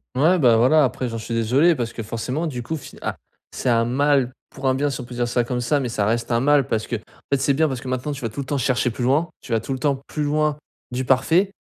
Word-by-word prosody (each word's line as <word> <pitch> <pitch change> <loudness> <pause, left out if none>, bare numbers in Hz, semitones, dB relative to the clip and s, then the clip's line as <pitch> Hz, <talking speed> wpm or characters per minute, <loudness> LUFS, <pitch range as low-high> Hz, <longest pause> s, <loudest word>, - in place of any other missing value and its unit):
Ouais 165 +8 +4
bah, 120 -6 +5
voilà, 130 +6 +5
après 130 0 -2
j'en 115 - -4
suis 115 +1 -5
désolé 130 +10 +3
parce 120 -4 -3
que 115 - -6
forcément 125 +9 -3
du 125 -5 -4
coup 160 +7 -3
fi 145 - -11
ah - - -3 0.3
c'est - - -5
un 115 -1 +3
mal 135 +1 +2 0.2
pour 135 - -9
un 130 - +4
bien 145 +2 0
si 135 - -4
on - - -6
peut 120 +1 -10
dire 120 0 -1
ça 120 0 +1
comme 125 +1 -2
ça. 135 +4 +1
Mais 125 - -2
ça 105 -3 0
reste 115 +3 -1
un 115 - +3
mal 145 +1 +3
parce 110 -1 -1
qu'en 120 - -2 0.3
fait 140 - +3
c'est 140 +1 +2
bien 155 +3 +3
parce 130 -4 -4
que 130 - -6
maintenant 130 +3 -2
tu 140 - -8
vas 115 - -2
tout 110 - -8
le 140 - -3
temps 145 +2 -1
chercher 125 -1 +1
plus 120 - -4
loin, 145 +7 +2
tu - - -11
vas 115 - +3
tout 135 - -4
le 130 - -4
temps 140 +1 +1
plus 150 - -3
loin 150 0 +1 0.3
du 125 +1 -2
parfait, 160 +10 +3
130 Hz, 295 wpm, -22 LUFS, 120-145 Hz, 0.3 s, bah